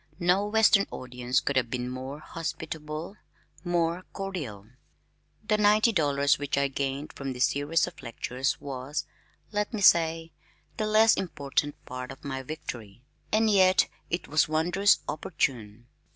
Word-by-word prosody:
No 180 +3 +2
western 210 -2 +4
audience 125 0 -1
could 140 - -2
have 120 -3 +1
been 125 0 -3
more 130 +3 -6
hospitable, 160 +2 -6 0.5
more 175 0 0
cordial. 155 - -5 0.8
The 215 -1 +2
ninety 210 +2 +5
dollars 140 -7 +2
which 145 -1 -2
I 140 0 +2
gained 140 +2 -3
from 135 -1 -5
this 125 0 +3
series 145 +4 +1
of 180 -2 -10
lectures 125 +3 -2
was, 140 +1 -4 0.5
let 210 -1 -1
me 210 - -3
say, 165 -2 +4 0.5
the 215 -2 -1
less 220 +1 +6
important 145 -4 -2
part 125 0 -6
of - - -12
my 135 -1 -3
victory, 120 -6 -8 0.3
and 220 +1 +3
yet 190 -3 +5 0.2
it 170 - -2
was 155 +1 +3
wondrous 175 +6 +3
opportune. 120 - -2
155 Hz, 140 wpm, -28 LUFS, 130-185 Hz, 0.8 s, less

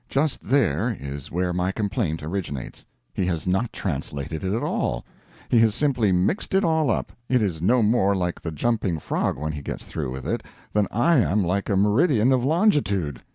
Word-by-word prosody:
Just 145 +1 0
there 115 - +1
is 70 0 -7
where 90 +1 0
my 90 +1 0
complaint 100 - -2
originates. 80 -6 -5 0.3
He 90 - -1
has 85 -3 -2
not 95 +5 0
translated 75 -2 -4
it 95 - -1
at 110 - -1
all; 60 0 -1 0.4
he 120 - +4
has 110 -2 +4
simply 125 -9 +2
mixed 95 - +1
it 195 - +4
all 160 -4 +2
up; 110 - -1 0.2
it 125 - +4
is 90 -8 -1
no 115 +6 +3
more 105 -2 +3
like 90 -2 -2
the 80 - -4
Jumping 95 +1 0
Frog 75 - -1
when 75 +2 -3
he 75 -2 -6
gets - - -6
through - - -4
with 65 0 -6
it - - -1 0.3
than 105 -1 +2
I 150 +7 +3
am 105 -3 +2
like 95 +3 -1
a 100 - +2
meridian 115 - +3
of 125 -2 +2
longitude. 135 - +1
100 Hz, 195 wpm, -24 LUFS, 85-120 Hz, 0.4 s, he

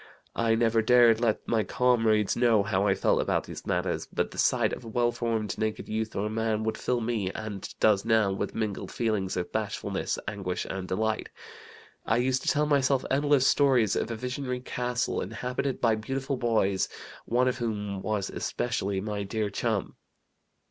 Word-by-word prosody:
I 115 -1 +2
never 115 0 +3
dared 120 -1 +5
let 115 -3 0
my 115 -1 +2
comrades 115 -5 +2
know 115 -4 +4
how 100 -1 +1
I 95 - +3
felt 95 - +2
about - - 0
these - - -9
matters, - - -1
but - - -1
the - - -8
sight - - +2
of - - -6
a - - -10
well 120 +1 +1
formed, 115 -3 -2
naked 110 -1 -2
youth 110 0 -3
or 100 +2 -1
man 110 0 -1
would 110 0 -1
fill 125 -1 -1
me 110 -5 -1
(and 110 -3 -6
does 105 -3 +4
now) 110 -3 +3
with 95 - -3
mingled 110 -3 -3
feelings 105 -6 -1
of 90 - -3
bashfulness, - - -2
anguish, 95 -3 -3
and 95 -1 -4
delight. 110 +3 -1 0.7
I 115 - +1
used 130 +1 +1
to - - -8
tell 150 +1 +3
myself 140 -2 +2
endless 140 -1 +3
stories 130 -9 +4
of - - -1
a 115 - -3
visionary 125 +2 -4
castle 125 -1 -2
inhabited 125 +6 -3
by 115 -2 +3
beautiful 135 +5 -2
boys, 110 -6 +1 0.4
one 125 +2 +2
of 125 0 -1
whom 105 -4 -3
was 105 -2 -2
especially 100 -5 -2
my 105 0 -3
dear 105 +1 -2
chum. - - -2
110 Hz, 175 wpm, -28 LUFS, 105-125 Hz, 0.7 s, dared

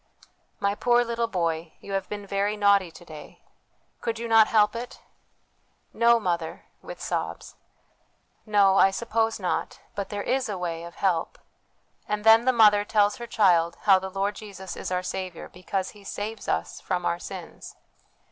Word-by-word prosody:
' - - -43
My 200 0 +1
poor 240 +3 +3
little 235 0 -1
boy, 170 -5 -2
you 200 - -10
have 195 -1 -2
been 205 -1 -6
very 200 +1 -1
naughty 200 -3 +4
to 175 +1 -15
day! 155 -2 -12 0.6
Could 230 -1 -3
you 235 +1 -4
not 225 -1 +6
help 210 0 +3
it? 240 +2 -7 0.3
' - - -43
' - - -43
No, 235 0 +4
mother,' 175 -5 -3 0.2
with - - -9
sobs. - - -4 0.5
' - - -42
No, 195 -1 +6
I 195 - +6
suppose 225 +2 -1
not; 185 - -2 0.2
but 200 -1 -4
there 205 -1 -4
is 260 -2 0
a 200 - -3
way 170 -2 -4
of 170 - -11
help.' 180 -4 -1 0.7
And 210 0 -2
then 225 +2 +7
the 260 - +5
mother 210 -4 +5
tells 205 -1 +2
her 235 - -7
child 175 -7 +3
how 195 -2 +5
the 190 0 -6
Lord 195 +2 -1
Jesus 200 -3 -9
is - - -5
our 180 0 -1
Saviour, 185 -2 -5
because 185 +1 -4
He 205 -1 -16
saves 210 +3 -6
us - - -2
from 180 -1 -2
our 170 - 0
sins. 180 -2 -9
200 Hz, 185 wpm, -26 LUFS, 185-225 Hz, 0.7 s, then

